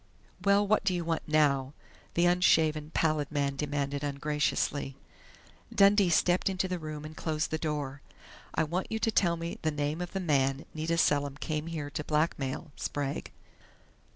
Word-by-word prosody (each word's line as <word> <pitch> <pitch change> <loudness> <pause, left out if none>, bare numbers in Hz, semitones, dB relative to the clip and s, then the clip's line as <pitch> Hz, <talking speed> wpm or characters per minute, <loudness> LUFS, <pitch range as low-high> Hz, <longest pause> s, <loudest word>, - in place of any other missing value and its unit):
"Well, 200 +1 +4
what 215 +1 +2
do 190 -2 +1
you 175 -1 -2
want 165 -1 -2
now?" 145 -3 +2 0.4
the 170 - +4
unshaven, 160 -4 +3
pallid 155 -3 +1
man 140 -2 0
demanded 145 0 -2
ungraciously. 145 -1 -1 0.8
Dundee 200 -1 +5
stepped 175 +3 +3
into 190 0 -1
the 180 -1 -3
room 155 -1 -6
and 155 +1 -9
closed 155 -1 -2
the 160 - -1
door. 145 -3 -3 0.5
"I - - +3
want 175 +4 -3
you 220 - 0
to 225 0 +1
tell 170 -5 +2
me 165 +1 -5
the 160 - +1
name 150 +2 -2
of 175 - -5
the 195 - -1
man 140 -5 +1
Nita 160 +2 -1
Selim 145 -3 +2
came 155 +1 -3
here 155 -3 -4
to 150 - -3
blackmail, 150 -2 -1
Sprague." 145 -1 -3
155 Hz, 165 wpm, -30 LUFS, 145-170 Hz, 0.8 s, Dundee